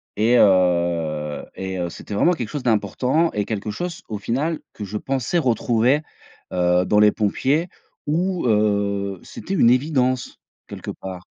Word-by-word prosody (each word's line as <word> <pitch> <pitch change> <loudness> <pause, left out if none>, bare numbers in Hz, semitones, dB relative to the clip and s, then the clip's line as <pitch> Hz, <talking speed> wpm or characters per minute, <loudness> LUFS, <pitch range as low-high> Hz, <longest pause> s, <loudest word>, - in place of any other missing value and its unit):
et 115 +4 +3
heu, 85 -6 +2
et 95 -1 -4
heu, 85 -1 -2
c'était 105 - -9
vraiment 175 - +3
quelque 120 -9 -4
chose 145 -3 -5
d'important 125 - +1
et 105 -1 -1
quelque 105 -1 -4
chose, 175 - -5
au 105 - -3
final, 140 +10 -1
que 105 - -7
je 105 +2 -4
pensais 135 +7 -1
retrouver, 125 0 +2 0.5
heu, 90 0 +2
dans 105 - +3
les 105 0 +6
pompiers 135 - 0 0.4
où 175 +1 0
heu, 100 -3 +1
c'était 195 - -7
une 120 -11 +5
évidence 130 -1 +1 0.3
quelque - - -7
part. 95 -2 -8
110 Hz, 155 wpm, -22 LUFS, 95-135 Hz, 0.5 s, les